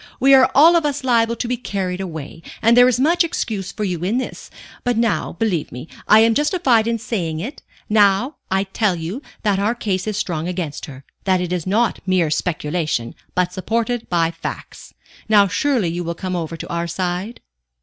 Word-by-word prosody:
We 270 +1 +5
are 265 -1 +7
all 320 +5 +7
of 335 - +3
us 290 -2 -2
liable 235 -2 +2
to 240 - -3
be 245 +1 -1
carried 190 -5 -3
away, 165 -3 -7 0.2
and 230 +1 +5
there 245 0 +7
is 250 -1 +1
much 340 +6 +3
excuse 215 - -3
for 215 - -5
you 180 -4 -2
in 205 +7 0
this. 260 - -5 0.3
But 245 -2 0
now 230 -2 0
believe 175 -5 -1
me, 125 +6 -8 0.2
I 215 +1 +7
am 225 0 +4
justified 275 - +2
in 230 0 0
saying 175 -8 -3
it 240 - -6 0.3
now 210 +6 +3
I 190 +1 +1
tell 200 0 0
you 175 - -5 0.2
that 205 -3 +1
our 210 +4 +1
case 195 -4 -2
is 210 -2 -2
strong 170 -5 -2
against 175 -5 -4
her, 135 -2 -11 0.2
that 190 -1 +3
it 180 0 -2
is 180 -1 -3
not 220 +5 +1
mere 180 -4 +2
speculation, 155 -6 -2 0.2
but 180 0 +1
supported 230 +5 -2
by 165 -2 +1
facts. 165 0 -8 0.3
Now 205 -2 +6
surely 240 -3 +1
you 175 +1 -3
will 170 0 -4
come 185 +1 -4
over 165 -1 -4
to - - -7
our 170 0 -2
side?" 180 +5 -3
195 Hz, 200 wpm, -20 LUFS, 175-235 Hz, 0.3 s, are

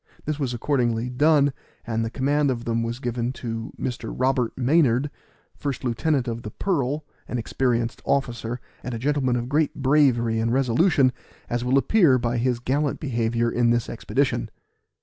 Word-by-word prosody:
This 150 0 -2
was 135 -4 -1
accordingly 120 -2 0
done, 145 +1 +4 0.3
and 115 -1 -1
the 115 - -2
command 145 +4 +1
of 120 -2 -2
them 115 0 0
given 120 0 -2
to 115 -3 -5
Mr. 125 -2 -4
Robert 130 -2 +1
Maynard, 135 0 +3 0.4
first 140 -4 -4
lieutenant 130 +2 0
of 115 0 -3
the 105 - -6
Pearl, 145 - -1 0.2
an 125 - -3
experienced 120 0 -1
officer, 120 -3 -1 0.2
and 125 -1 -4
a - - -3
gentleman 130 0 +1
of 120 0 -2
great 150 +2 +1
bravery 130 -5 +3
and 115 +1 0
resolution, 130 +2 +3 0.4
as 120 0 0
will 125 +2 +2
appear 155 -3 +4
by 120 -1 -1
his 125 0 +1
gallant 135 +4 -1
behavior 115 -3 0
in 120 -1 +2
this 120 -1 +1
expedition. - - -1
125 Hz, 160 wpm, -24 LUFS, 120-140 Hz, 0.4 s, done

